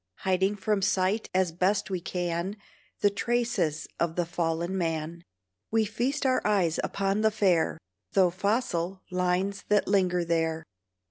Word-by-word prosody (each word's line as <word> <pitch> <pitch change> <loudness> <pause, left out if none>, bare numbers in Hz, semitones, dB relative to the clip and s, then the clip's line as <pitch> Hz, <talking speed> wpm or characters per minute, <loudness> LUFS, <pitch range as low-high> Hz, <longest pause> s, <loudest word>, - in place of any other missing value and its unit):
Hiding 190 +2 +1
from 205 0 0
sight 195 +2 +1
as 185 -2 +2
best 195 +4 0
we 185 - -1
can 175 +3 -2 0.4
The 205 - +4
traces 205 -8 0
of 170 -1 0
the 175 - 0
fallen 170 +1 -1
man, 165 -1 -2 0.5
We 225 0 +2
feast 245 +8 -1
our 255 -1 +3
eyes 190 -6 +2
upon 195 +1 0
the 220 - +4
fair, 185 -7 +2 0.4
Though 185 -3 +4
fossil, 190 -2 -1
lines 180 +2 0
that 210 0 +2
linger 180 -3 +2
there. 165 -1 0
185 Hz, 140 wpm, -28 LUFS, 170-205 Hz, 0.5 s, The